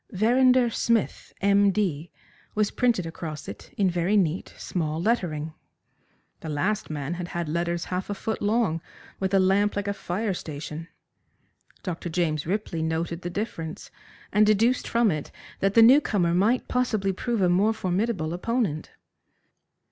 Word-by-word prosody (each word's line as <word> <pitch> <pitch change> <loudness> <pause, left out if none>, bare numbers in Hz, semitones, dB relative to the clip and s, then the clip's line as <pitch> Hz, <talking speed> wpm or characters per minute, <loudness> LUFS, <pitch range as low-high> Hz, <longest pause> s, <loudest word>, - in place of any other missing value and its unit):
"Verrinder 245 +4 +4
Smith, 230 -1 0
M. 200 0 +4
D.," 175 -6 -1 0.5
was 210 -1 +1
printed 235 -8 +1
across 160 -2 -6
it 100 - -9
in 200 - +3
very 180 +3 +1
neat, 180 -2 0
small 160 -3 -2
lettering. 165 -7 -1 0.9
The 160 - -7
last 185 +8 -1
man 150 +1 -3
had 175 0 -5
had 175 -2 -3
letters 170 +2 -1
half 185 +2 -2
a 205 - -2
foot 220 +2 -3
long, 205 -6 +1 0.4
with 190 -1 -1
a 195 - +4
lamp 195 +2 +3
like 205 0 -2
a 200 - 0
fire 200 +2 -2
station. 155 0 -6 1.0
Dr. 175 -2 -4
James 155 -3 -1
Ripley 190 -3 -2
noted 165 +2 -2
the 175 - -4
difference, 170 -5 -5 0.4
and 210 +2 +5
deduced 220 +4 +3
from 230 -3 +3
it 155 -2 -4 0.3
that 195 +1 +1
the 230 - +8
new 265 +6 +8
comer 175 - +1
might 215 +8 +2
possibly 215 -6 0
prove 235 +4 -2
a - - +5
more 190 +5 +3
formidable 190 -4 -1
opponent. 185 -4 -1
190 Hz, 155 wpm, -26 LUFS, 165-215 Hz, 1.0 s, the